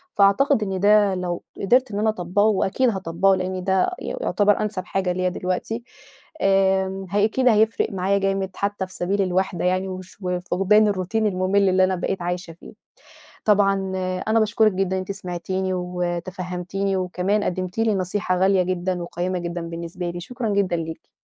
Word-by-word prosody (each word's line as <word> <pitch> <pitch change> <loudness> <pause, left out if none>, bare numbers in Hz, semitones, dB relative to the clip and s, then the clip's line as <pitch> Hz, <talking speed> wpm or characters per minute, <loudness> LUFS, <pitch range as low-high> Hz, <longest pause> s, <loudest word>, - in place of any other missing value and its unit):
فأعتقد 215 +5 +4
إن 190 -2 -2
ده 205 0 +4
لو 180 -1 -3 0.2
قدرت 250 +5 +3
إن 200 - -2
أنا 220 +1 +2
أطبّقه 200 0 0
وأكيد 220 +4 +2
هاطبّقه 190 -1 +1
لإن 185 0 -3
ده 190 0 +2
ي - - -6 0.2
يعتبر 205 - +2
أنسب 210 -4 -3
حاجة 190 -1 -1
ليّا 185 0 0
دلوقتي 185 +6 -3 0.6
آمم، 190 0 +2
هي 205 +1 +3
أكيد 255 +4 +1
هيفرق 220 -1 +3
معايا 195 +1 +1
جامد 195 -1 0
حتى 200 -1 -2
في 185 - -15
سبيل 195 +3 -1
الوحدة 185 -1 0
يعني، 185 +1 +1
وش 185 -1 -8
وفقدان 185 +3 +2
الroutine 185 +2 -5
المُمِل 200 -2 +2
اللي 185 0 +4
أنا 185 0 +2
بقيت 180 +1 -3
عايشة 175 -1 -4
فيه، 165 - -14 0.7
طبعًا 200 -2 +4 0.5
أنا 225 +1 +3
باشكرِك 215 0 +3
جدًا 190 0 -1
إن - - -1
أنتِ 185 +1 -4
سمعتيني 185 0 -3
وتفهّمتيني، 180 +2 -3
وكمان 185 +3 0
قدمتِ 185 +2 -3
لي 225 -1 +2
نصيحة 185 0 -1
غالية 190 0 +4
جدًا 180 0 -2
وقيِّمة 180 +2 -3
جدًا 175 0 -4
بالنسبة 170 +1 -5
لي، 175 0 -6
شكرًا 245 +5 -4
جدًا 200 -3 +1
ليكِ. 165 -1 -6
190 Hz, 165 wpm, -23 LUFS, 180-200 Hz, 0.7 s, فأعتقد